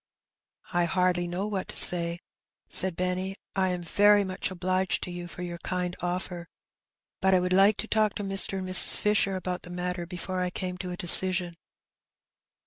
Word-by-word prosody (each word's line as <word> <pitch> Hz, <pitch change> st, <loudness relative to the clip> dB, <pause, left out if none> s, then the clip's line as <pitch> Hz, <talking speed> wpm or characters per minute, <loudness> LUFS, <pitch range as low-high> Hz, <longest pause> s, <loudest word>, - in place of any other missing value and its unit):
^' -, -, -18 dB
''I 175 Hz, -1 st, 0 dB
hardly 180 Hz, 0 st, -1 dB
know 180 Hz, +3 st, -5 dB
what 205 Hz, -3 st, -5 dB
to -, -, -8 dB
say/' 170 Hz, -1 st, +5 dB, 0.5 s
said 190 Hz, -2 st, +3 dB
Benny. 185 Hz, +2 st, -4 dB, 0.2 s
*'I 190 Hz, -1 st, 0 dB
am 180 Hz, -1 st, -5 dB
very 205 Hz, +4 st, +2 dB
much 185 Hz, -1 st, -5 dB
obliged 185 Hz, 0 st, -3 dB
to 180 Hz, -, -7 dB
you 175 Hz, 0 st, -8 dB
for 180 Hz, +1 st, -10 dB
your 175 Hz, -1 st, -8 dB
kind 180 Hz, 0 st, -5 dB
oflfer, 175 Hz, 0 st, -6 dB, 0.7 s
but 190 Hz, 0 st, +2 dB
I -, -, +2 dB
would 180 Hz, 0 st, -2 dB
like 195 Hz, +2 st, +3 dB
to 225 Hz, -, -6 dB
talk 215 Hz, -1 st, 0 dB
with 205 Hz, -, -6 dB
Mr. 195 Hz, 0 st, +2 dB
and 185 Hz, -1 st, -6 dB
Mrs. 185 Hz, 0 st, +6 dB
Fisher 205 Hz, -2 st, -1 dB
about 185 Hz, -1 st, -6 dB
the 180 Hz, -, -14 dB
matter 180 Hz, 0 st, -6 dB
before 185 Hz, +1 st, -6 dB
I 180 Hz, -, -2 dB
came 180 Hz, 0 st, -7 dB
to 185 Hz, -, -7 dB
a 180 Hz, -, -7 dB
decision.' 180 Hz, 0 st, +6 dB
185 Hz, 190 wpm, -25 LUFS, 175-190 Hz, 0.7 s, Mrs